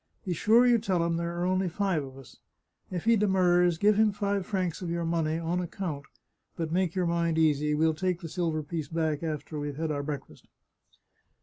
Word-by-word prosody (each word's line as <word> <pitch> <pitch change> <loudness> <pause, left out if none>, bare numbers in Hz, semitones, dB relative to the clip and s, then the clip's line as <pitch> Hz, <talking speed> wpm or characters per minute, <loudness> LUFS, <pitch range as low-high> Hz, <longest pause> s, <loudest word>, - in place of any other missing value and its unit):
Be 185 - -1
sure 225 +8 +4
you 240 -1 +5
tell 185 -6 0
him 170 0 0
there 170 0 -3
are 175 - 0
only 185 0 +1
five 185 -3 0
of 135 -1 -10
us. 135 -2 -14 0.5
If 180 -1 -4
he 230 0 +5
demurs, 180 -4 +3
give 205 +3 +3
him 220 -1 +4
five 200 -2 -2
francs 185 -5 -2
of 180 - -4
your 170 0 -2
money, 165 -1 0
on 170 +2 -1
ac 175 - -5
count; 155 -8 -4 0.5
but 165 -2 -3
make 180 0 0
your 185 -1 +1
mind 170 -1 0
easy, 150 -1 +2
we'll 160 +1 +2
take 180 +2 -1
the 165 - -6
silver 160 -2 -2
piece 155 0 -4
back 160 -1 -1
after 155 -1 -4
we've 145 -1 -4
had 160 0 -2
our 145 -1 -2
breakfast." 145 0 -7
170 Hz, 210 wpm, -28 LUFS, 155-185 Hz, 0.5 s, you